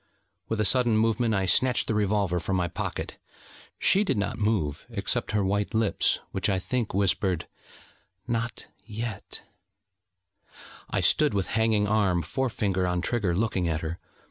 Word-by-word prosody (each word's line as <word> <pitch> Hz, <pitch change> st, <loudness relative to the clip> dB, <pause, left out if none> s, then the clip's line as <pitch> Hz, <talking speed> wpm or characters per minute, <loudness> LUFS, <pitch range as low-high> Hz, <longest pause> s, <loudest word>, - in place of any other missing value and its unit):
With 110 Hz, -, -1 dB
a 105 Hz, -, +2 dB
sudden 120 Hz, +1 st, +3 dB
movement 115 Hz, 0 st, +2 dB
I 95 Hz, -1 st, +1 dB
snatched 125 Hz, +7 st, +3 dB
the -, -, -1 dB
revolver 100 Hz, -4 st, +1 dB
from 95 Hz, +3 st, -2 dB
my 90 Hz, -1 st, +1 dB
pocket: 85 Hz, -, -5 dB, 0.6 s
she 200 Hz, -, +4 dB
did 195 Hz, -, 0 dB
not 100 Hz, +2 st, -2 dB
move, 105 Hz, -10 st, -1 dB
except -, -, -1 dB
her 105 Hz, -2 st, +1 dB
white 105 Hz, +3 st, -1 dB
lips, 110 Hz, -2 st, +2 dB
which, 95 Hz, +2 st, 0 dB
I 95 Hz, -, +2 dB
think, 115 Hz, +2 st, -2 dB
whispered: 95 Hz, -3 st, +1 dB, 0.8 s
'Not 115 Hz, 0 st, -2 dB, 0.2 s
yet....' 110 Hz, -1 st, -5 dB, 1.5 s
I -, -, 0 dB
stood 150 Hz, -7 st, +3 dB
with 95 Hz, -, -1 dB
hanging 110 Hz, -2 st, +2 dB
arm, 100 Hz, -5 st, +2 dB
forefinger 100 Hz, -, -1 dB
on 90 Hz, 0 st, 0 dB
trigger, 100 Hz, -4 st, 0 dB
looking 95 Hz, -3 st, 0 dB
at 80 Hz, -1 st, -1 dB
her. 80 Hz, +2 st, -4 dB
105 Hz, 150 wpm, -27 LUFS, 95-115 Hz, 1.5 s, she